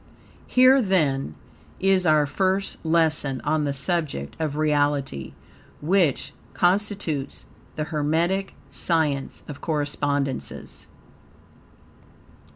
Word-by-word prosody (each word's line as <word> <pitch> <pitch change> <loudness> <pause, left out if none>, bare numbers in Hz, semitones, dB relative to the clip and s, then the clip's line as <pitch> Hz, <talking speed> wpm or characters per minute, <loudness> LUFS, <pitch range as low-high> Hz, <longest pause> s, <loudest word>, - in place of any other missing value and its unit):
Here, 255 +1 +6
then, 145 - 0 0.4
is 190 -2 +3
our 155 -1 +4
first 190 +6 -1
lesson 160 -5 +1
on 150 0 0
the 140 - 0
subject 140 - -2
of 155 -3 -2
REALITY, 145 - 0 0.4
which 170 -3 +1 0.2
constitutes 185 -6 0 0.3
the 155 - -2
Hermetic 165 +5 -1 0.2
science 150 -5 -1
of 145 -3 -9
Correspondences. 145 -3 -3
155 Hz, 85 wpm, -24 LUFS, 145-180 Hz, 0.4 s, Here